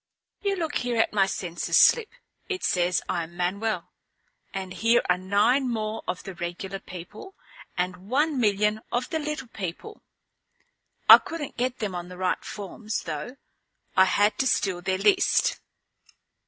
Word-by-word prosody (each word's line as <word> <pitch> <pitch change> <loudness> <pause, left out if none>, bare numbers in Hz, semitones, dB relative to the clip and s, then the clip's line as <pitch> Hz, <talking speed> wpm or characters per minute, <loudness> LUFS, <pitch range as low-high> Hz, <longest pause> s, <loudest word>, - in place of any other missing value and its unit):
"You 400 -1 0
look 325 -5 -2
here 245 -1 -2
at 225 - +2
my 195 -2 +3
census 175 -3 -1
slip. 465 -3 +6 0.4
It 380 -2 -3
says 180 -1 +1
I'm 170 -1 -3
Manuel. 200 +5 -2 0.6
And 190 -1 -5
here 230 +3 +3
are 180 - +3
nine 215 +8 +2
more 220 -1 -2
of 180 - -3
the 195 - -7
regular 180 +3 -5
people, 185 - -10 0.4
and 180 +2 -3
one 290 +2 +1
million 210 -1 +2
of 245 +8 -2
the 320 - 0
little 300 -5 -4
people. 200 - -7 1.1
I - - +12
couldn't 320 -4 -6
get 250 +1 -1
them 210 -4 -3
on 175 0 -5
the 180 - -10
right 185 0 -1
forms, 210 +1 -5
though. 165 - -5 0.6
I 190 - +7
had 205 +2 +2
to 265 - +2
steal 185 -7 +1
their 185 +1 0
list." 395 - +3
210 Hz, 155 wpm, -26 LUFS, 185-255 Hz, 1.1 s, I